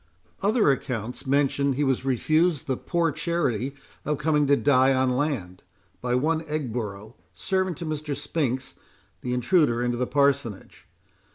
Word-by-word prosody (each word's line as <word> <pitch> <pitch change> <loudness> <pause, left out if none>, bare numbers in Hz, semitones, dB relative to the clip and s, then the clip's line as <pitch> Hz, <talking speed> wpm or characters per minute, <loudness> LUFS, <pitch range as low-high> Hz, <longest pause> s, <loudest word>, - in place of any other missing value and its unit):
Other 210 - +3
accounts 125 -1 -4
mention 140 0 +2
he 145 +3 0
was 135 -2 +1
refused 155 +4 +1
the 130 - -1
poor 170 +4 0
charity 140 -6 -1 0.3
of 150 0 -1
coming 150 -1 +2
to 140 - +5
die 135 -1 +4
on 130 0 +2
land, 125 - -2 0.4
by 125 0 0
one 155 +5 +1
Egborough, 115 -7 -4 0.2
servant 185 -2 -1
to 175 - -5
Mr. 155 -2 -3
Spinks, 140 -3 -2 0.5
the 125 - -3
intruder 125 -1 +2
into 120 0 0
the 125 0 -1
parsonage. 140 -7 0
140 Hz, 145 wpm, -25 LUFS, 125-155 Hz, 0.5 s, to